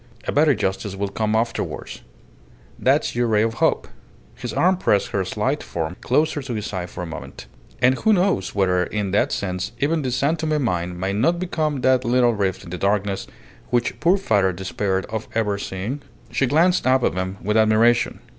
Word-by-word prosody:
A - - +1
better 150 -1 +4
justice 95 0 -2
will 100 0 -2
come 110 +2 -1
afterwards. 115 +1 -3 0.8
That's - - +2
your 120 0 +1
ray 110 -1 +3
of 115 0 -2
hope." - - +2 0.5
His - - -6
arm 185 +1 +2
pressed 105 - +1
her 95 - 0
slight 120 +10 -1
form 80 +1 -4
closer 150 +3 +1
to 130 -3 -5
his 105 -1 -3
side 90 -4 -4
for 90 - -6
a - - -4
moment. 80 -6 -8 0.4
"And 125 +1 +6
who 220 - +3
knows 180 - +1
whether 90 -2 +2
in 100 +1 -3
that 100 - +2
sense 90 -2 -3
even 155 +3 +1
the 130 - -2
San 140 +6 +1
Tome 155 -1 0
mine 90 -5 -2
may 95 +2 -1
not 165 +12 +2
become 155 -6 -1
that 130 0 +3
little 120 0 +3
rift 95 -3 -1
in 85 - -11
the 90 - -5
darkness 100 -1 0 0.4
which 120 -1 0
poor 180 +4 +4
father 100 - +2
despaired 95 +1 -2
of 110 0 -5
ever 105 -3 0
seeing?" 100 +10 -4 0.3
She 135 - +1
glanced 165 +4 +3
up 130 0 +4
at - - +2
him 95 +2 -3
with 105 +2 0
admiration. 110 +2 +3
110 Hz, 195 wpm, -22 LUFS, 95-135 Hz, 0.8 s, And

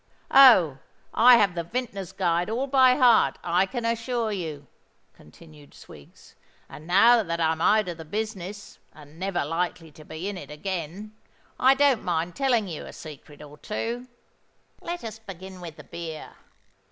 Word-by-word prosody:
"Oh! 190 - +7 0.3
I 245 +1 +7
have 200 -5 +2
the 170 -1 -3
Vintners' 200 -2 -5
Guides 175 0 -1
all 240 +5 -1
by 260 -2 +4
heart, 245 -5 +4
I 180 +3 +1
can 240 0 -5
assure 230 0 -1
you," 160 -7 -5 0.5
continued 150 - -18
Swiggs; 70 -2 -16 0.3
"and 155 - -12
now 230 +6 +5
that 170 -4 -4
I'm 160 0 0
out 215 +2 +3
of 170 -2 -6
the - - -7
business, 205 +1 -6
and 150 +1 -16
never 190 -5 -2
likely 165 0 -3
to 155 - -15
be 160 +4 -7
in 200 -2 -5
it - - -11
again, 185 +5 -6 0.5
I 265 +1 +5
don't 275 -4 +2
mind 170 0 -2
telling 250 -6 +1
you 165 -4 -7
a - - -11
secret 150 -1 -12
or 150 0 -14
two. 235 +3 -5 0.7
Let 345 +1 -6
us 225 -1 -7
begin 190 -3 -11
with 165 -3 -9
the - - -13
beer. 165 -2 -8
185 Hz, 165 wpm, -25 LUFS, 165-230 Hz, 0.7 s, Oh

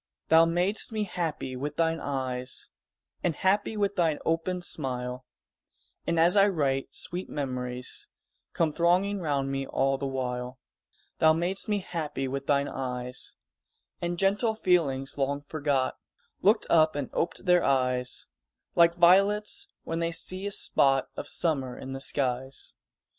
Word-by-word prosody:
Thou 160 +1 +7
mad'st 180 +7 0
me 215 -1 -1
happy 165 -8 -3
with 145 +4 -4
thine 165 0 +1
eyes, 130 -3 -3 0.5
And 170 -3 +1
happy 205 +5 +1
with 200 -1 0
thine 165 -4 +2
open 170 +2 0
smile, 125 -5 -3 0.8
And, 170 -1 +1
as 170 +3 +5
I 200 0 +6
write, 140 -8 0
sweet 180 +1 -4
memories 125 -3 -4 0.4
Come 160 -3 +1
thronging 185 +5 +2
round 140 -5 -1
me 135 0 -2
all 135 0 +1
the 140 - -2
while; 125 -1 -3 0.6
Thou 160 0 +6
mad'st 175 +6 -1
me 205 -1 +1
happy 150 -5 -3
with 140 +1 -4
thine 140 0 +2
eyes 125 -1 -4 0.7
And 175 0 -2
gentle 205 +4 +2
feelings 145 -10 +1
long 140 +1 0
forgot 145 -3 -1 0.4
Looked 215 +3 +4
up 160 -2 +4
and 145 -3 -3
oped 170 - -2
their 180 -1 +5
eyes, 125 -2 +1 0.5
Like 170 0 +5
violets 195 +4 +4 0.2
when 165 0 -3
they 170 0 0
see 185 +3 -4
a - - -3
spot 135 -8 +2
Of - - -5
summer 135 -7 0
in 135 - -7
the 135 - -5
skies. 130 -1 -2
155 Hz, 145 wpm, -28 LUFS, 135-175 Hz, 0.8 s, Thou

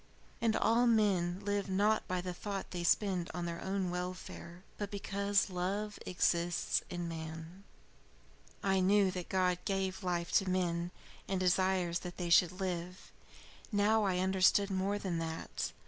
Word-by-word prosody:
And 225 -1 +2
all 235 +2 +3
men 195 -5 +2
live 205 -1 -1
not 205 +3 +2
by 180 -1 -1
the 180 0 -4
thought 195 +1 -5
they 175 -1 -3
spend 180 -1 +1
on 175 -1 -2
their 170 0 -4
own 190 -2 -1
welfare, 180 0 -6 0.2
but 205 -1 -3
because 200 0 0
love 200 +4 -2
exists 175 -1 +1
in 175 -2 -4
man. 160 +3 -7 1.0
"I 190 -1 +2
knew 200 +2 +4
before 185 - -4
that - - -14
God 185 -1 +2
gave 195 -1 -2
life 175 -2 -1
to 195 - -4
men 175 -2 0 0.4
and 190 -1 -1
desires 185 -1 +2
that 180 -1 -8
they 175 -2 -3
should 180 +2 +5
live; 180 -1 -4 0.6
now 210 +1 +3
I 190 -3 +1
understood 190 +2 +3
more 195 +2 0
than 185 -5 -2
that. 160 0 -4
185 Hz, 155 wpm, -33 LUFS, 175-200 Hz, 1.0 s, should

